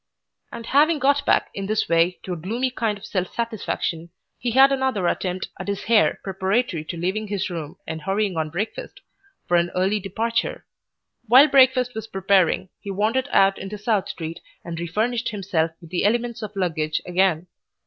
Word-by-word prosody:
And 230 -1 -7
having 300 +6 +4
got 285 0 +2
back - - +2
in 195 -1 -4
this 215 +1 0
way 170 +2 +2
to 185 - -4
a - - -3
gloomy 230 +10 -2
kind 225 -4 -1
of 200 - -11
self 185 -3 -2
satisfaction, 210 -7 -3 0.3
he 245 - -1
had 265 +3 +6
another 265 -8 0
attempt 180 +1 -1
at - - -6
his 200 -1 -3
hair 225 -2 +3
preparatory 190 -2 -1
to 170 - -6
leaving 190 +6 -2
his 200 -2 -2
room 160 -4 -6
and 160 -1 -5
hurrying 195 +1 -1
on 160 -1 -1
breakfast, 195 +8 -5 0.5
for 175 - +3
an 170 0 +1
early 190 +3 +1
departure. 230 - -2 0.6
While 260 +7 +8
breakfast 260 -2 +4
was 220 0 -6
preparing 190 -2 +2
he 200 - -8
wandered 220 +7 0
out 195 0 +4
into 195 +2 -6
South 210 -1 0
Street 165 0 -6 0.3
and 165 -1 -5
refurnished 225 +8 -1
himself 190 -6 -1
with 170 -2 -15
the 180 - 0
elements 235 +2 0
of 215 -1 -7
luggage 160 -5 -1
again. 180 -2 +1
200 Hz, 180 wpm, -23 LUFS, 180-230 Hz, 0.6 s, While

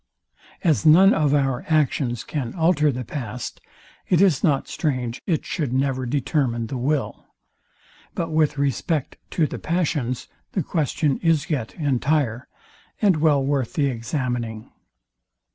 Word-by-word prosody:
As 160 -4 +2
none 180 +6 +7
of 150 -3 +2
our 135 -3 0
actions 140 -6 +1
can 130 -6 -4
alter 160 -3 +3
the 125 -1 -5
past, 120 -1 -6 0.5
it 175 - +4
is 180 -8 +3
not 140 -4 +2
strange 125 -6 -2
it 165 -6 0
should 145 -7 -2
never 130 -1 0
determine 130 -3 0
the 130 +4 -5
will. 140 +2 -2 0.9
But 165 -1 -2
with 155 -2 +2
respect 140 +2 -1
to 165 - +1
the - - -5
passions 150 -7 -1 0.3
the 185 - 0
question 150 -2 0
is 165 -2 +1
yet 125 -7 -2
entire, 140 -4 0 0.5
and 195 -6 +3
well 150 -3 +3
worth 135 -4 -1
the 140 -2 +1
examining. 120 -2 -3
140 Hz, 135 wpm, -23 LUFS, 125-155 Hz, 0.9 s, none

